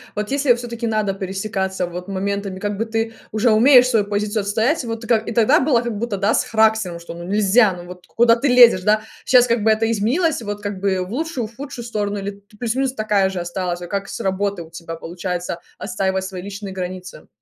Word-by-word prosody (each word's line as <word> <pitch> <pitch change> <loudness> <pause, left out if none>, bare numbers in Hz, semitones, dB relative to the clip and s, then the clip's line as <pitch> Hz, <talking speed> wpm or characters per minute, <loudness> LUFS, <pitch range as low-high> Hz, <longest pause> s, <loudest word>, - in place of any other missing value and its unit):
вот 210 0 -3
если 280 0 -1
я 245 - +7
всё-таки 235 -1 -5
надо 215 -3 0
пересекаться 190 -1 -3
вот 175 +1 -7
моментами, 200 0 -3
как 205 0 -3
бы 225 - -1
ты 225 0 -2 0.2
уже 220 +3 +2
умеешь 250 +3 +6
свой 225 -5 +2
позицию 205 +1 -1
отстоять, 225 +10 0
вот, 225 0 -5
и - - -8
ка 235 - +4
и 220 +1 -5
тогда 225 -1 +4
было 260 -4 +2
как 235 -3 -4
будто, 220 -1 -2
да, 200 +3 +2
с - - +2
характером, 220 -5 +1
что, 170 0 -9
ну, 170 - -8
нельзя, 205 +3 +3
ну 175 0 -10
вот 180 0 -11
куда 230 0 +4
ты 270 +4 0
лезешь, 240 -7 +7
да, 215 +2 +3 0.2
сейчас 250 -1 +5
как 230 -2 +1
бы 220 - +4
это 220 +1 +1
изменилось 255 - +1
вот 205 -1 -5
как 205 -2 -4
бы 190 -1 0
в 180 - -9
лучшую, 270 -3 -3
худшую 245 +1 -8
сторону 205 -3 -2
или 200 0 -4
т 200 +1 -14
плюс-минус 250 +4 -1
такая 210 -5 +1
же 190 - -4
осталась, 175 0 -3
вот 175 -1 -8
как 200 -1 -3
с - - -6
работы 195 0 -1
у 160 - -11
тебя 165 0 -8
получается 175 +1 -4 0.2
отстаивать 190 -1 -1
свои 190 -1 -6
личные 200 0 -7
границы. 185 -1 -7
205 Hz, 225 wpm, -20 LUFS, 190-230 Hz, 0.2 s, я